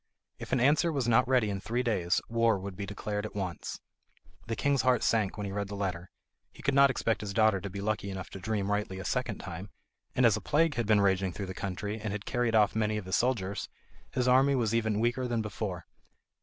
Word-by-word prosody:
If - - -8
an - - +2
answer 150 +7 +3
was 135 -6 -1
not 120 +2 +4
ready 125 -5 +3
in 100 - -3
three 120 +5 -1
days, 95 -7 +1
war 115 -2 +2
would 95 0 -6
be 100 +1 -5
declared 105 +1 -3
at 110 - -7
once. 95 -4 -4 0.7
The 115 - -2
king's 140 +3 +2
heart 125 -3 +2
sank 110 -4 +1
when 105 - -3
he 100 - -4
read 100 0 -2
the 100 - -6
letter. 90 -3 -3 0.4
He - - -15
could 140 - +1
not 140 0 +6
expect 115 -3 0
his 100 -2 -5
daughter 110 -4 +4
to 100 - -5
be 100 +1 -6
lucky 105 -1 -1
enough 95 -2 -6
to 95 - -7
dream 100 0 -1
rightly 105 -2 -1
a 95 - -6
second - - -1
time, 95 +5 -7 0.5
and 125 - +4
as 115 -3 +5
a 110 - -4
plague 160 +1 +2
had 120 -5 -2
been 105 -1 +5
raging 95 -2 +2
through 100 - -4
the 95 - -6
country, 105 +3 -4
and 105 -1 -3
had 105 -1 -5
carried 120 -2 0
off 105 -2 +4
many 110 -1 +1
of 105 - -5
his 95 - 0
soldiers, 100 -6 0 0.4
his 125 -1 -1
army 135 +2 +5
was 115 -4 0
even 110 -2 +1
weaker 120 +3 0
than 115 -2 -1
before. 100 -4 -4
105 Hz, 235 wpm, -30 LUFS, 100-120 Hz, 0.7 s, not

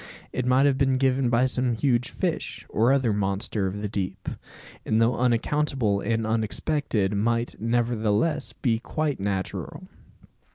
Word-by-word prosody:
It 125 -1 -2
might 130 +2 +4
have 140 -2 +2
been 135 -1 +3
given 130 -1 +2
by 120 +1 +3
some 125 -2 0
huge 120 0 +1
fish, 145 -9 -3
or 115 +4 +3
other 130 -5 +2
monster 100 0 -1
of 100 +2 -5
the - - 0
deep; 95 -2 -4 0.5
and 110 - +1
though 115 +2 +3
unaccountable 125 -2 +1
and 115 +2 -1
unexpected, 110 -1 0
might, 115 +3 0
nevertheless, 115 +4 0
be 115 -4 0
quite 155 +3 -2
natural. 95 -1 -4
115 Hz, 140 wpm, -25 LUFS, 105-130 Hz, 0.5 s, might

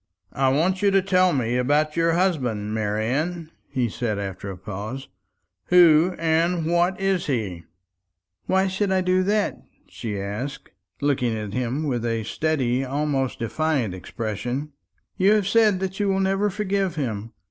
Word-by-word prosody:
"I 135 -1 +2
want 170 +8 +1
you 205 - +4
to 195 0 +4
tell 185 -1 +3
me 125 -4 0
about 150 +4 +1
your 165 0 +2
husband, 125 - 0
Marian," 130 +11 -1 0.2
he 125 -2 0
said 110 -1 -2
after 100 -1 -5
a 95 - -6
pause; 105 +8 -6 0.6
"who 175 0 +5
and 165 +1 +1
what 175 +3 +1
he 195 - -2
is." 120 - -1 0.8
"Why 190 0 +3
should 190 +1 -1
I 190 0 +2
do 185 0 +2
that?" 205 +2 0 0.3
she 105 -3 -5
asked, 115 +8 -5 0.3
looking 130 -5 +1
at 105 -2 -5
him 125 +5 -1
with 125 -6 -1
a 115 -1 -1
steady, 130 0 0
almost 135 -1 -1
defiant, 125 - -1
expression. 115 - -4 0.5
"You 195 +3 +5
have 210 -3 +2
said 215 -2 +4
that 190 +1 -3
you 205 - +1
will 195 0 +1
never 195 +2 +1
forgive 195 -3 -1
him. 115 -6 -4
145 Hz, 155 wpm, -24 LUFS, 115-185 Hz, 0.8 s, who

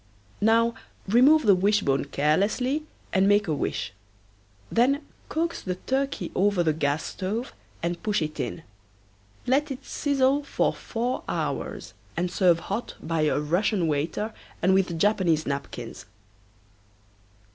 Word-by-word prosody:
Now 230 +2 +4 0.3
remove 260 +9 +6
the 205 -4 +6
wishbone 185 -8 +2
carelessly 200 - +1 0.3
and 190 0 +4
make 205 0 +4
a 155 - +1
wish. 115 -8 -2 0.8
Then 275 +5 +2 0.2
coax 335 +2 -1
the 180 -1 -3
turkey 270 +8 -2
over 200 -1 +2
to - - +2
the 160 -2 +2
gas 145 0 0
stove 215 +7 -4 0.3
and 170 0 -2
push 210 -1 +1
it 155 0 -5
in. 165 - -3 0.8
Let 280 +4 +2
it 270 0 -6
sizzle 280 0 +1
for 280 - 0
four 245 +2 -3
hours - - -3 0.2
and 175 0 0
serve 175 -3 +3
hot 210 +5 -4
by 165 -1 -1
a 150 - +2
Russian 175 +5 +1
waiter 160 +9 -1 0.3
and 185 +3 +3
with 185 -3 +2
Japanese 175 -4 +2
napkins. 140 0 -5
200 Hz, 135 wpm, -26 LUFS, 165-250 Hz, 0.8 s, remove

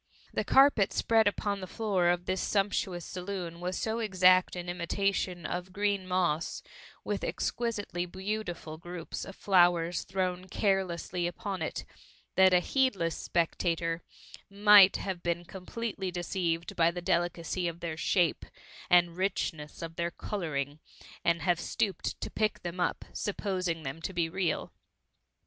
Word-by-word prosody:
The - - 0
carpet 270 -7 +5
spread 225 -2 +3
upon 205 0 0
the 185 - -5
floor 195 -4 0
of 175 0 +1
this 185 0 -1
sumptuous 195 -4 0
saloon 180 -2 -5
was 180 +1 -3
so 225 +1 -1
exact 185 -4 +4
an 175 0 -5
imitation 180 0 -1
of 180 +3 -4
green 200 -1 0
moss, 175 -4 0 0.4
with - - -2
exquisitely 215 - -2
beautiful 185 -4 -4
groups 175 -1 -6
of 195 - -9
flowers 175 -3 +3
thrown 185 -1 -2
carelessly 185 -3 0
upon 190 +1 -4
it, 160 - -3 0.5
that 190 0 +6
a 180 -1 +5
heedless 200 - +1
spectator 165 0 -1 0.5
might 200 -1 +7
have 190 -3 -4
been 175 0 -1
completely 195 +2 -5
deceived 175 -2 -2
by 165 -1 +4
the 175 +1 -5
delicacy 175 +1 0
of 170 0 -4
their 170 -2 -4
shape 170 +1 +1 0.5
and 175 -1 +4
richness 170 -5 -2
of 165 0 -7
their 170 0 0
colouring, 155 -7 -4 0.4
and 170 -2 +2
have 175 -1 +2
stooped 195 0 -2
to - - -4
pick 215 -1 -1
them 175 +1 -5
up, 180 - -1
supposing 185 -5 -2
them 135 +4 -5
to 190 - -4
be 170 -2 +1
real. 185 0 -1
180 Hz, 140 wpm, -30 LUFS, 170-195 Hz, 0.5 s, might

